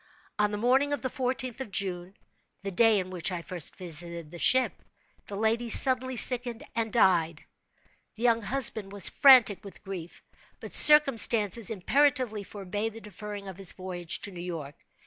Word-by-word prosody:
On 210 0 +1
the 210 - -5
morning 265 +6 0
of 285 - -5
the 260 - -4
fourteenth 255 -1 -4
of 265 - -8
June 190 -1 -5 0.5
(the 195 - -6
day 225 +3 +2
in 185 -1 -5
which 180 -1 -3
I 175 -2 -6
first 175 -4 -2
visited 170 -2 -6
the 175 - -11
ship), 260 +6 0 0.5
the 200 - -8
lady 225 +3 -2
suddenly 260 +1 +3
sickened 240 -1 +4
and 225 -1 -3
died. 170 -7 0 0.7
The 225 - -9
young 230 -1 +1
husband 220 -3 +2
was 200 -3 +4
frantic 255 -8 +4
with 200 0 -13
grief—but 185 -4 -12
circumstances 230 -8 +5
imperatively 250 +1 -1
forbade 205 +2 -6
the 225 - -12
deferring 205 0 -10
his 190 0 -4
voyage 180 -3 -7
to 205 - -8
New 175 -2 -10
York. 165 -5 -8
210 Hz, 160 wpm, -26 LUFS, 185-240 Hz, 0.7 s, circumstances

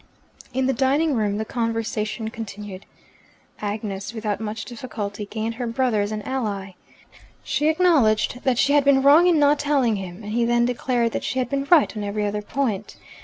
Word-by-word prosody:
In 260 +1 0
the 265 - +2
dining 280 +5 +2
room 210 -4 0
the 220 - -2
conversation 225 -2 -2
continued. 205 -4 -8 0.7
Agnes, 205 0 -4
without 215 -2 -2
much 215 0 -4
difficulty, 215 -5 -6
gained 220 +2 -3
her 245 - -1
brother 230 -2 +1
as 205 +1 -2
an 215 -1 -4
ally. 205 -7 -3 0.7
She 300 - 0
acknowledged 280 -9 +3
that 255 -3 +2
she 280 +3 +3
had 290 -1 +5
been 270 -1 +4
wrong 300 +6 +7
in 345 -3 +4
not 290 0 +4
telling 275 -7 +2
him, 190 +1 -8
and 210 - -6
he 235 +1 +2
then 240 0 +3
declared 245 -1 0
that - - -3
she 260 - -3
had 255 -2 0
been 275 0 -1
right 325 -9 +5
on 210 - -4
every 205 +1 -2
other 205 0 -2
point. 215 -3 -3
230 Hz, 185 wpm, -23 LUFS, 210-265 Hz, 0.7 s, wrong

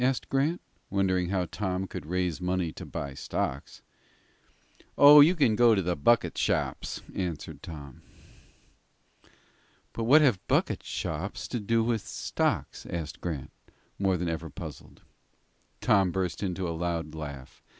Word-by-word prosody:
asked 130 -1 +1
Grant, 145 +6 +1 0.3
wondering 95 -2 +1
how 95 -2 0
Tom 95 0 -3
could 75 - -8
raise 90 -1 -1
money 90 -2 -1
to - - -9
buy 70 -1 -5
stocks. 65 0 -4 1.1
"Oh, 145 +1 +10
you 165 +5 +6
can 130 -9 +3
go 120 0 +5
to 95 - +1
the 90 0 0
bucket 110 +11 +2
shops," - - -1
answered 85 -5 -4
Tom. 70 -5 -9 1.9
"But 115 - -3
what 150 +6 +7
have 125 -10 +3
bucket - - +1
shops 95 +6 -4
to 120 - -2
do 115 +2 +1
with 115 -2 0
stocks?" - - -2
asked 85 -2 -5
Grant, 80 -7 -4 0.5
more 95 -2 +2
than 90 0 -2
ever 80 0 -3
puzzled. - - -10 0.8
Tom 95 -3 +4
burst 90 -1 -2
into 95 -2 -2
a 85 - -2
loud 85 -2 -3
laugh. 70 -4 -8
90 Hz, 140 wpm, -28 LUFS, 80-110 Hz, 1.9 s, Oh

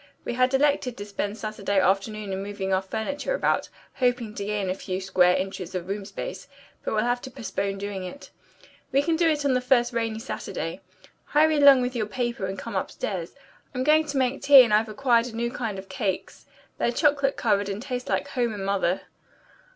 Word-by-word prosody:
We - - -2
had 255 +1 +2
elected 270 -3 +1
to 205 - -6
spend 205 +1 -3
Saturday 205 -2 -1
afternoon 195 +2 0
in 190 - -3
moving 195 -1 -3
our 190 - +2
furniture 280 - -3
about, - - 0 0.2
hoping 245 -4 0
to 205 - -5
gain 205 -1 -2
a 185 - 0
few 185 -1 -4
square 185 -1 +3
inches 185 -1 -4
of 180 -1 -3
room 200 +1 -3
space, 210 - -6 0.4
but - - -2
we'll 215 - +2
have 245 +1 0
to 260 - -7
postpone 200 -6 -3
doing 200 -1 -4
it. 185 +10 -9 0.6
We 275 +1 +3
can 330 +2 +1
do 330 0 +3
it 300 -2 +1
the 260 -3 +2
first 245 -1 +2
rainy 225 -1 -1
Saturday. 225 +4 -5 0.4
Hurry 310 +1 +3
along 280 -3 +7
with 250 +1 -3
your 215 -3 -1
paper 235 -3 -2
and 190 +1 -5
come - - -6
upstairs. - - -3 0.4
I'm 255 - 0
going 310 +2 +4
to 285 -1 -3
make 260 +1 0
tea, 280 -2 +9
and 225 -3 0
I've 215 +1 +3
acquired 235 +1 +2
a 230 - -8
new 235 +1 -1
kind 225 -6 -3
of 190 0 -8
cakes. 205 -8 -4 0.3
They're 235 - +2
chocolate 280 0 +2
covered 205 -3 +1
and 200 +1 -3
taste 250 +1 -5
like - - 0
home 240 -4 -1
and 195 -1 -5
mother." 190 -2 +1
225 Hz, 205 wpm, -25 LUFS, 200-260 Hz, 0.6 s, tea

